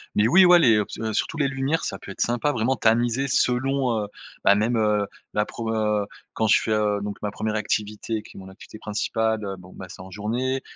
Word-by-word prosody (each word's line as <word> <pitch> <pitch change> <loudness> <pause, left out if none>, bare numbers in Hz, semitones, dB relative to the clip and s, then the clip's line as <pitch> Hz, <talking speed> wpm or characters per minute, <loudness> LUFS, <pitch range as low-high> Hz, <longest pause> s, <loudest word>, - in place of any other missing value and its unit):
Mais 105 +1 +4
oui, 185 +10 +6
ouais, 175 -1 +7
les 120 -8 +5
heu 105 - +2
ps - - -9
surtout 160 - -2
les 140 -2 +2
lumières, 135 +4 -1
ça 95 - -4
peut 100 - -9
être - - -12
sympa, 120 +5 +1
vraiment 125 0 0
tamisées 120 +4 +1
selon, 125 -1 +1
heu, 105 - -5 0.4
bah, 100 - +6
même 115 +3 +1 0.6
la 105 0 +1
pro 115 -1 -5
heu 105 -2 0 0.3
quand 110 - 0
je - - +5
fais, 110 - -3
heu, 105 -1 +1
donc 100 0 -5
ma 105 -1 -3
1re 110 +1 -3
activité 105 +1 -2
qui - - -16
est - - -9
mon 95 - -11
activité 105 +2 -13
principale, 110 -1 -2
bon, 90 0 -14
bah, 95 - -8
c'est - - -10
en 95 0 -11
journée, 125 +7 -2
110 Hz, 225 wpm, -24 LUFS, 105-125 Hz, 0.6 s, ouais